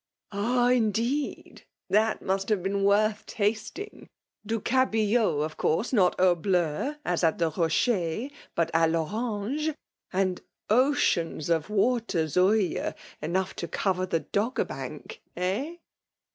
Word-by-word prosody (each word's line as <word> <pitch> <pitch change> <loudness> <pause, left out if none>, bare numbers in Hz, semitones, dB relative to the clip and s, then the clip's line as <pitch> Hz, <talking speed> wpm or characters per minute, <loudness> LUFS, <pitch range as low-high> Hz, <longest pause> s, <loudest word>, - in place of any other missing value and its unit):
" - - -44
Ah! 240 +5 +1
— - - +4
indeed! 235 +4 -1 0.2
— - - -26
Tkal 215 +1 +3
must 195 +1 -1
have 205 -5 +1
been 195 +1 0
worth 210 +1 +3
tasting? 220 - -3 0.3
Du 225 +2 -2
cabillot, 220 - +2
of 155 - -8
course 215 +12 0
not 185 -6 +3
au 180 -1 +5
bUu, 180 - 0
(as 175 0 0
at 160 -1 +3
the 165 -2 +1
Rocher) 175 - 0 0.3
hut 165 -1 +1
a 165 0 +4
T 165 - +1
Orange; 225 - -2 0.4
and 185 -1 0 0.3
oceans 195 - +2
of 165 +2 +1
water 215 -5 +1
Zuije, 185 +5 +1 0.3
enough 185 +5 -1
to 170 - -3
cover 185 +2 -1
the 165 -3 0
Doggerbank 230 - -3
— - - -47
eh? 205 - -1
200 Hz, 140 wpm, -27 LUFS, 175-230 Hz, 0.4 s, au